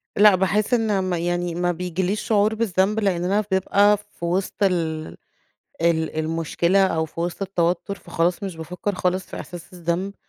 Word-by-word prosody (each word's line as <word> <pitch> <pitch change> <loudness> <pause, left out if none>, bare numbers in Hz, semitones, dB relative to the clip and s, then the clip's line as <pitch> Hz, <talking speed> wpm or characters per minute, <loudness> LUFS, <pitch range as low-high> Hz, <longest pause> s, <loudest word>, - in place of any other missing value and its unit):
لأ، 205 -1 +7
باحس 200 +6 +1
إن 215 -5 +2
م 185 -1 -1
يعني 175 0 -1
ما 175 0 +1
بيجيليش 180 +3 -2
شعور 215 0 +2
بالذنب 210 -1 +1
لأننا 195 +1 +1
بنبقى 200 +2 +4
في 205 -4 -9
وسط 185 +3 -1
ال 160 -4 0 0.7
ال 160 -2 +1
المشكلة، 165 +4 +1
أو 160 -3 0
في 165 - -8
وسط 175 +3 -3
التوتر 180 0 0
فخلاص 175 0 -1
مش 190 -4 -4
بافكَّر 180 +5 -4
خالص 185 0 -1
في - - -9
احساس 175 0 -10
الذنب، 180 +3 -2
180 Hz, 160 wpm, -23 LUFS, 170-200 Hz, 0.7 s, لأ